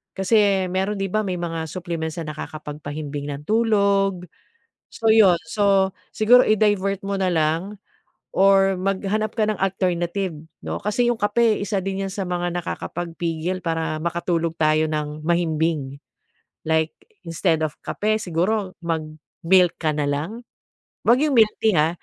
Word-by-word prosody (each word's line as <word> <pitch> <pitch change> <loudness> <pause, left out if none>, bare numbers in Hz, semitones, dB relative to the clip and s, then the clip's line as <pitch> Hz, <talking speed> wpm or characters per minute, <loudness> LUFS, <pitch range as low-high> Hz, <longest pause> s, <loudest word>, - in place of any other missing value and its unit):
Kasi 195 -1 +2
mayro'n, 190 +3 -1
'di 195 0 -2
ba, 215 - +1
may 185 - -1
mga 165 -2 -3
supplements 165 -2 -4
na 155 -1 -5
nakakapagpahimbing 150 -1 -6
ng 140 +1 -8
tulog. 200 -4 +2 0.7
So 225 - 0
'yon. 210 -5 +6
So 195 -1 +2 0.2
siguro 245 +4 +6
i-divert 205 -2 +2
mo 200 0 -1
na 190 -1 +1
lang 165 +6 0 0.6
or 195 0 +4
maghanap 195 +3 -1
ka 220 -3 +2
ng 215 - -1
alternative, 185 -1 -1 0.3
'no. - - -3
Kasi 240 +4 +1
'yong 240 - 0
kape 215 +1 +3
isa 200 0 -1
din 195 0 -2
'yan 190 - -5
sa 200 - -3
mga 175 -1 -2
nakakapagpigil 175 0 -4
para 165 -1 -1
makatulog 170 0 -1
tayo 155 0 +3
ng 150 0 -4
mahimbing. 160 -4 0 0.7
Like 160 0 +1 0.3
instead 160 -1 +1
of 150 - -5
kape, 215 +1 -1
siguro 185 +2 -1
mag 165 -2 -1 0.4
milk 180 0 +5
ka 155 -2 +1
nalang? 150 +10 -2 0.6
Huwag 235 - +6
'yong 300 -2 +1
milk 220 -2 +5
tea, 220 -3 +4
ha. 155 +1 +4
185 Hz, 145 wpm, -22 LUFS, 160-200 Hz, 0.7 s, yon